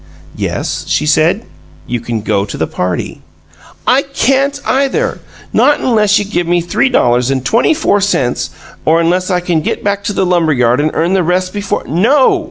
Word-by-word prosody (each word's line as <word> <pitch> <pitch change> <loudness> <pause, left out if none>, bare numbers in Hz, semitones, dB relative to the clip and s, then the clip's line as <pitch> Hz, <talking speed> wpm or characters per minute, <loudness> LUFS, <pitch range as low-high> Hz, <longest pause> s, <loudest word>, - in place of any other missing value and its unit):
"Yes," - - -3
she 150 - 0
said, 160 +8 +2 0.4
"you 120 - -3
can 115 -1 -4
go 100 -1 0
to 100 - -6
the 80 - 0
party." 90 +2 -4 0.6
"I 260 +2 +4
can't, 275 0 0
either! 275 - 0 0.3
Not 290 - +3
unless 215 -4 +2
you 205 - -1
give 175 -4 -2
me 175 0 +2
three 175 +10 0
dollars 125 - +2
and 130 -2 -1
twenty 240 +7 +2
four 205 -10 +1
cents, 135 -11 0 0.3
or 160 +1 +3
unless 180 +3 +1
I 180 -1 +1
can 175 -3 0
get - - -3
back 200 0 -1
to 205 - -1
the 190 - 0
lumber 170 -3 +2
yard 125 0 +2
and 150 +1 +1
earn 170 +3 +1
the 190 - +2
rest 180 +2 -1
before 205 -1 -2
" - - -14 0.2
"No!" 280 - +4
180 Hz, 190 wpm, -13 LUFS, 150-225 Hz, 0.6 s, I